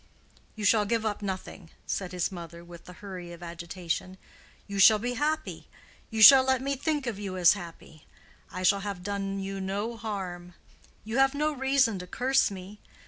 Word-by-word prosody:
"You 215 -2 -4
shall 210 0 +4
give 225 +1 -1
up 210 -1 -2
nothing," 190 -3 -6 0.2
said 185 -2 -3
his 180 +1 -2
mother, 170 -2 -9
with 170 -1 -13
the 180 - -11
hurry 180 -3 -7
of 170 +1 -12
agitation. 175 +2 -5 0.5
"You 200 -1 -5
shall 215 +3 +8
be 245 +3 -3
happy. 305 +4 -2 0.4
You 220 -1 +2
shall 265 +2 +11
let 260 0 +2
me 275 +2 -2
think 295 0 -2
of 225 -5 -4
you 195 -2 -5
as 175 -2 +6
happy. 170 -5 -11 0.4
I 185 - -5
shall 200 +2 +4
have 195 -3 -6
done 195 0 -3
you 195 0 -5
no 205 +5 -3
harm. 185 -6 -6 0.5
You 220 +4 -2
have 270 +1 +3
no 300 +1 +1
reason 265 -6 +1
to 180 - -8
curse 260 +7 +2
me. 195 +1 -10
200 Hz, 185 wpm, -28 LUFS, 180-235 Hz, 0.5 s, shall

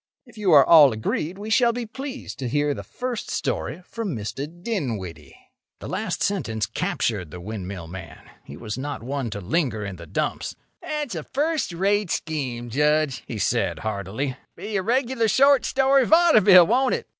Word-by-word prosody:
If 240 - -18
you 205 -4 +1
are 140 -3 +8
all 150 -5 +8
agreed, 155 - -3
we 210 +2 -6
shall 235 +1 +4
be 240 0 -4
pleased 270 +4 -7
to 130 -3 -3
hear 145 +2 +1
the - - -6
first 250 -2 -5
story 175 +4 -3
from 220 - -4
Mr. 115 +6 -4
Dinwiddie." 125 - -5 0.4
The - - -9
last - - -2
sentence 115 - -1
captured 100 -8 -2
the 90 +3 -9
windmill 95 -2 -6
man. 95 +3 -10 0.2
He 70 - -11
was 105 +6 -5
not 145 -2 -5
one 135 -1 -3
to 100 - -5
linger 110 - -1
in 95 -2 -6
the 85 0 -11
dumps. - - -3 0.3
"That's 300 -6 -4
a 165 - -3
first 295 - -1
rate 195 +3 +1
scheme, 130 -9 -3
Judge," 150 0 +1
he 115 - -5
said, 95 - 0
heartily. 110 +6 -3 0.2
"Be 210 0 -6
a 195 - +2
regular 240 +2 +1
short 275 +3 +4
story 270 0 +3
vaudeville, 215 - +7
won't 255 +6 +2
it? - - -6
155 Hz, 175 wpm, -24 LUFS, -, 0.4 s, are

